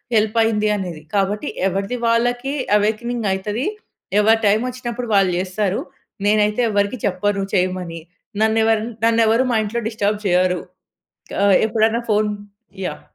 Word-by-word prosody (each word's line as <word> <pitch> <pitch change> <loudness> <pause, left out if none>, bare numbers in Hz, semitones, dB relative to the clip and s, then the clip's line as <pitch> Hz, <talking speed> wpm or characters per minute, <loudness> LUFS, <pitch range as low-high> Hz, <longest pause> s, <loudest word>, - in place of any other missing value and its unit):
Help 220 +1 +2
అయింది 215 -1 +1
అనేది. 175 -6 -6
కాబట్టి 200 +1 0 0.2
ఎవరిది 195 +6 -3
వాళ్ళకి 245 +4 +1 0.2
అవేకెనింగ్ 225 +2 -1
అయితది. 210 +7 -2 0.5
ఎవరి 225 +1 +4
టైం 205 +2 +4
వచ్చినప్పుడు 245 -1 -5
వాళ్ళు 195 -2 +4
చేస్తారు. 190 +1 -1 0.5
నేనైతే 210 +2 +2
ఎవరికీ 205 +4 0
చెప్పను 200 +1 -1
చేయమని. 180 -3 -1 0.4
నన్నేవరన 220 0 +2 0.2
నన్నేవరు 230 +1 +3
మా - - +3
ఇంట్లో 235 +3 -3
డిస్టర్బ్ 210 -2 -1
చేయరు. 180 0 +2 0.8
ఆహ్, 200 -2 +6
ఎప్పుడైనా 225 +1 +1
ఫోన్ 210 0 +2 0.6
యాహ్! - - -7
210 Hz, 125 wpm, -20 LUFS, 195-230 Hz, 0.8 s, ఆహ్